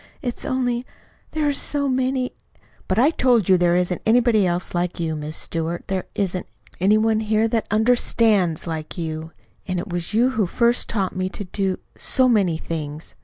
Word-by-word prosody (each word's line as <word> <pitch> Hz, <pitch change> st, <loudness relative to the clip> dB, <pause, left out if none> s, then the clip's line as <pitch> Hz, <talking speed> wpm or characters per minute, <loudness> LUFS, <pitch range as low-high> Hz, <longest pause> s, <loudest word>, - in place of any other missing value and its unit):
"It's 245 Hz, -2 st, -3 dB
only 245 Hz, -2 st, 0 dB, 0.5 s
There 310 Hz, -1 st, 0 dB
are 290 Hz, -, +2 dB
so 280 Hz, 0 st, -1 dB
many 260 Hz, 0 st, 0 dB, 0.3 s
" -, -, -32 dB
"But -, -, 0 dB
I 270 Hz, +7 st, +5 dB
told 245 Hz, -, +3 dB
you 190 Hz, -, +6 dB
there 175 Hz, -1 st, +3 dB
isn't 180 Hz, 0 st, 0 dB
anybody 225 Hz, -4 st, +3 dB, 0.2 s
like 175 Hz, 0 st, -1 dB
you, 160 Hz, -2 st, -1 dB
Miss 150 Hz, +1 st, -5 dB
Stewart. 165 Hz, +1 st, -3 dB
There 190 Hz, -1 st, -2 dB
isn't 185 Hz, -2 st, -2 dB, 0.3 s
any 200 Hz, +4 st, +4 dB
one 220 Hz, 0 st, +2 dB
here 220 Hz, 0 st, +1 dB
that 225 Hz, -1 st, -1 dB
UNDERSTANDS 215 Hz, -5 st, +2 dB
like 160 Hz, -1 st, -5 dB
you. 160 Hz, -1 st, -4 dB, 0.4 s
And 185 Hz, -1 st, -1 dB
it 180 Hz, +4 st, -4 dB
was 175 Hz, -1 st, -3 dB
you 240 Hz, +4 st, +3 dB
who 220 Hz, -7 st, 0 dB
first 235 Hz, +6 st, +1 dB
taught 195 Hz, -4 st, -1 dB
me 185 Hz, 0 st, -1 dB
to 205 Hz, -, -7 dB
do 190 Hz, 0 st, -2 dB, 0.2 s
so 260 Hz, -1 st, +3 dB
many 195 Hz, -9 st, +2 dB
things." 155 Hz, -2 st, -6 dB
200 Hz, 180 wpm, -22 LUFS, 175-240 Hz, 0.5 s, you